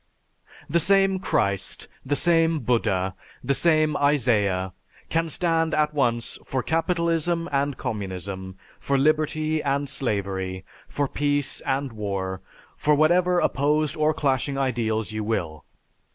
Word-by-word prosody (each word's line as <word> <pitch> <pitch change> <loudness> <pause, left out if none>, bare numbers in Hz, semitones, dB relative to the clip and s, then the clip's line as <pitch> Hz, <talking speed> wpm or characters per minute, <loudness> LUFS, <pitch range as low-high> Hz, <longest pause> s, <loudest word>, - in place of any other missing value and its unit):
_The 170 - +2
same 195 0 +3
Christ, 100 - -1 0.2
the 145 +2 0
same 165 +1 +3
Buddha, 105 -6 0 0.3
the 140 - +1
same 155 0 +3
Isaiah, 105 - +1 0.4
can 165 0 0
stand 165 -1 +1
at 150 0 +1
once 120 -5 0
for 130 -2 -2
capitalism 170 0 0
and 140 -1 0
communism, 95 -2 -5 0.2
for 140 - 0
liberty 155 +2 +1
and 140 0 0
slavery, 95 -8 -2 0.2
for 145 -1 -1
peace 145 0 -1
and 135 0 0
war, 95 -3 -3 0.3
for 150 0 +2
whatever 175 +4 +3
opposed 150 0 +1
or 155 0 +2
clashing 135 -2 0
ideals 115 -5 -1
you 110 0 -3
will. 85 -9 -3
140 Hz, 125 wpm, -24 LUFS, 105-155 Hz, 0.4 s, same